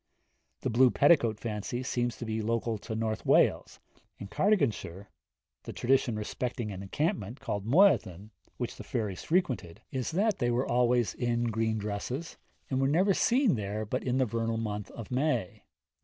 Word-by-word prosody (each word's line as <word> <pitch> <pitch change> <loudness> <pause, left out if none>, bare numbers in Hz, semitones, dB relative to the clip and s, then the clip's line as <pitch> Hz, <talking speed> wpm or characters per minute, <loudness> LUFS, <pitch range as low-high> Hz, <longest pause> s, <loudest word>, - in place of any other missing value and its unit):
The - - -1
blue 125 +3 +5
petticoat 120 -7 +3
fancy 115 +2 -4
seems 120 -1 -1
to 120 - -6
be 110 0 -2
local 115 0 -1
to 110 +2 -6
North 110 0 -2
Wales. - - +2 0.4
In 100 - -8
Cardiganshire, 105 - 0 0.5
the - - -8
tradition 130 -2 +1
respecting 115 +1 -3
an 95 -1 -6
encampment 115 - -2
called 100 0 -4
Moyddin, 110 - +3 0.3
which - - -4
the - - -8
fairies 105 -5 -3
frequented, 130 - -1
is 130 -2 -2
that 205 +6 +1
they 120 - +1
were 120 +2 +1
always 120 -1 +2
in 120 -1 -1
green 110 0 0
dresses, 105 +10 -4 0.3
and 130 -1 -1
were 135 - +3
never 185 +8 +3
seen 245 +4 +3
there 105 -1 -3
but 125 +5 -3
in 125 0 0
the 130 - +3
vernal 115 0 -2
month 105 -2 -4
of 115 -1 -9
May. 125 - -1
115 Hz, 165 wpm, -29 LUFS, 105-130 Hz, 0.5 s, blue